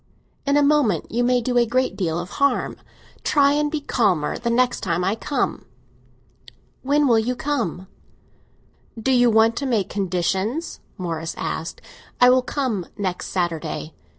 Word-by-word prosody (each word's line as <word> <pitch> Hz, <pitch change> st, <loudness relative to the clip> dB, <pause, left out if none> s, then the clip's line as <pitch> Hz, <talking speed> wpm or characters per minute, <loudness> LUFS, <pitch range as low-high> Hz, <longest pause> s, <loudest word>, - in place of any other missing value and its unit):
"In 280 Hz, +1 st, +3 dB
a 290 Hz, -, +4 dB
moment 280 Hz, -, +2 dB
you 240 Hz, +2 st, +1 dB
may 245 Hz, 0 st, +2 dB
do 245 Hz, +1 st, +1 dB
a 240 Hz, -, +4 dB
great 255 Hz, +3 st, 0 dB
deal 165 Hz, -4 st, -1 dB
of 175 Hz, +1 st, -5 dB
harm. 280 Hz, -, +2 dB, 0.5 s
Try 280 Hz, -1 st, +4 dB
and 295 Hz, 0 st, +1 dB
be 310 Hz, 0 st, -2 dB
calmer 200 Hz, -, +1 dB
the 235 Hz, -, -2 dB
next 250 Hz, +1 st, +2 dB
time 175 Hz, -2 st, -1 dB
I 190 Hz, +3 st, +1 dB
come." 275 Hz, +5 st, -2 dB, 1.2 s
"When 290 Hz, +2 st, +2 dB
will 230 Hz, -3 st, +4 dB
you 245 Hz, +3 st, -1 dB
come?" 235 Hz, -, -2 dB, 1.1 s
"Do 245 Hz, +4 st, 0 dB
you 245 Hz, -1 st, +5 dB
want 225 Hz, +1 st, +4 dB
to 280 Hz, -, -2 dB
make 225 Hz, -6 st, 0 dB
conditions?" 190 Hz, -, -2 dB, 0.2 s
Morris 165 Hz, -2 st, -4 dB
asked. 165 Hz, +1 st, -4 dB, 0.4 s
"I 250 Hz, 0 st, +7 dB
will 255 Hz, 0 st, +4 dB
come 250 Hz, -, -2 dB
next 185 Hz, -3 st, -3 dB
Saturday." 165 Hz, -3 st, -3 dB
230 Hz, 155 wpm, -22 LUFS, 185-260 Hz, 1.2 s, I